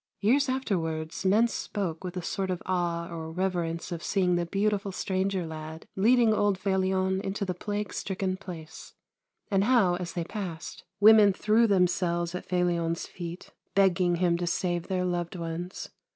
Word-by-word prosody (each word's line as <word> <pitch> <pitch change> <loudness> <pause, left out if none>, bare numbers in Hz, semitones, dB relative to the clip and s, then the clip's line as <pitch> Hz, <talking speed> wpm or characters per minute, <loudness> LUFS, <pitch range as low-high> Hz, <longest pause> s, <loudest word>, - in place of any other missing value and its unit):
Years 260 +7 +3
afterwards 165 -11 -2
men 215 +5 +5
spoke 190 -7 -4
with 180 0 -5
a 180 - -3
sort 190 +2 -2
of 180 -1 -3
awe 170 -2 -1
or 160 -1 -6
reverence 175 -1 -2
of 170 -1 -4
seeing 180 -2 +1
the 175 -1 -1
beautiful 200 +1 0
stranger 190 -1 -1
lad 160 0 -7
leading 230 +2 +4
old 205 -2 +2
Felion 190 0 +1
into 200 +1 -2
the 185 - -2
plague 205 +2 -4
stricken 190 -1 -2
place, 170 -4 -10 0.6
and 195 0 +3
how, 210 -8 +4
as 175 -2 -5
they 170 - -2
passed, 175 -3 -6
women 210 -1 +7
threw 220 +4 +3
themselves 175 -3 +1
at 180 - -6
Felion's 170 -2 0
feet, 175 0 -8 0.2
begging 185 -2 +3
him 170 -1 +2
to 175 - -2
save 175 -1 -1
their 185 -2 0
loved 175 0 -2
ones. 170 +2 -5
185 Hz, 160 wpm, -28 LUFS, 170-195 Hz, 0.6 s, women